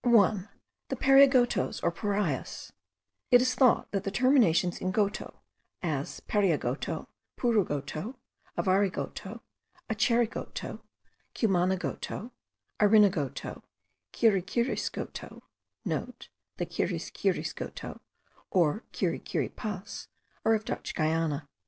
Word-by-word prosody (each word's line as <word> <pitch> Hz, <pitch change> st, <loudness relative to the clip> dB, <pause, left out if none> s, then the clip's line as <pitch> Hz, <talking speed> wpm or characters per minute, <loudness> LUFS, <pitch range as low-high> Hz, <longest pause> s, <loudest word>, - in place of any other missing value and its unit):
1. 210 Hz, -4 st, +4 dB, 0.4 s
The -, -, -1 dB
Pariagotos 270 Hz, -2 st, +5 dB
or -, -, +3 dB
Parias. 200 Hz, -, -2 dB, 0.6 s
It 245 Hz, -, +8 dB
is 255 Hz, 0 st, +2 dB
thought 250 Hz, -1 st, +4 dB
that 195 Hz, -1 st, -1 dB
the 195 Hz, -, -1 dB
terminations 200 Hz, -, +3 dB
in 185 Hz, -, 0 dB
goto, 200 Hz, +1 st, -1 dB, 0.4 s
as 150 Hz, -5 st, -2 dB
Pariagoto, 160 Hz, -, 0 dB, 0.3 s
Purugoto, 190 Hz, -, 0 dB, 0.4 s
Avarigoto, 195 Hz, +2 st, 0 dB, 0.5 s
Acherigoto, 230 Hz, +2 st, 0 dB, 0.6 s
Cumanagoto, 190 Hz, +3 st, 0 dB, 0.5 s
Arinagoto, 200 Hz, -, +3 dB, 0.5 s
Kirikirisgoto,* 225 Hz, +3 st, -1 dB, 0.3 s
(* -, -, -50 dB
The -, -, -5 dB
Kirikirisgotos -, -, -3 dB, 0.5 s
(or 175 Hz, +2 st, +2 dB
Kirikiripas) 205 Hz, -3 st, -3 dB, 0.4 s
are 225 Hz, -, +4 dB
of 215 Hz, 0 st, -3 dB
Dutch -, -, -4 dB
Guiana. 155 Hz, -2 st, 0 dB
200 Hz, 85 wpm, -29 LUFS, 175-230 Hz, 0.6 s, It